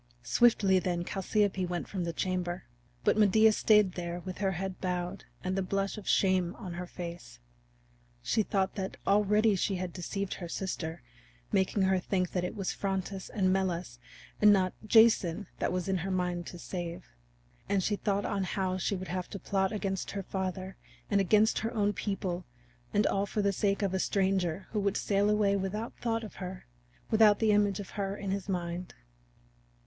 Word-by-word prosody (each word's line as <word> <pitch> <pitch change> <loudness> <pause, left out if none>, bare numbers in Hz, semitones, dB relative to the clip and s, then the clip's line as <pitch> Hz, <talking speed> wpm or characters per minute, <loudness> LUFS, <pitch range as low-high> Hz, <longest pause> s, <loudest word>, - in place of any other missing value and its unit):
Swiftly 195 - +4
then 175 -1 -1
Chalciope 195 -1 0
went 175 0 -3
from 185 -3 -3
the 170 - -1
chamber. 180 0 -2 0.4
But 215 - +3
Medea 215 +2 +6
stayed 210 -2 +4
there 175 -1 -4
with 185 0 -7
her 195 -2 +1
head 190 +1 -4
bowed 180 +1 -3 0.2
and 185 0 -1
the 195 - +1
blush 195 +1 -1
of 210 -3 -9
shame 185 -2 +2
on 185 -6 -7
her 175 +1 -5
face. 170 - -8 0.9
She 220 - +2
thought 195 -2 0
that 190 -1 -4
already 210 +1 +4
she 195 +1 0
had 180 -2 -4
deceived 195 +2 -3
her 175 - -6
sister, 165 -5 -4 0.5
making 190 +1 +2
her 190 0 +3
think 180 -1 -1
that 180 - -1
it 180 - -3
was 195 -2 -2
Phrontis 195 -1 -3
and 185 -3 +2
Melas 180 -9 -2 0.4
and 210 0 +8
not 185 -2 +3
Jason 215 -5 +5
that - - 0
was 180 +1 -2
in 190 -1 +1
her 180 +2 -3
mind 180 -2 -1
to 175 - -8
save. 175 0 -5 0.6
And 195 -2 +2
she 210 - +1
thought 200 0 -1
on 200 -2 -1
how 185 0 -1
she 200 - 0
would 185 0 -6
have 180 0 -3
to - - -6
plot 190 +1 0
against 195 -3 -2
her 200 -1 -4
father 190 0 -4 0.3
and 200 -1 +4
against 215 +3 +4
her 225 +1 -2
own 205 -1 +2
people, 185 -3 -3 0.5
and 205 - +2
all 200 +1 +1
for 210 +1 -1
the 200 0 +2
sake 200 +1 +1
of 195 -2 0
a 190 - +1
stranger 190 -3 0
who 215 - 0
would 200 -1 +1
sail 200 0 +2
away 210 -1 +3
without 200 +4 -3
thought 230 -1 0
of 215 - -9
her, 185 0 -7 0.5
without 215 -2 +6
the 220 -2 +3
image 205 -2 +3
of 200 - -7
her 200 -1 -3
in 195 -1 -3
his 200 0 -3
mind. 175 -1 -3
190 Hz, 185 wpm, -30 LUFS, 180-205 Hz, 0.9 s, and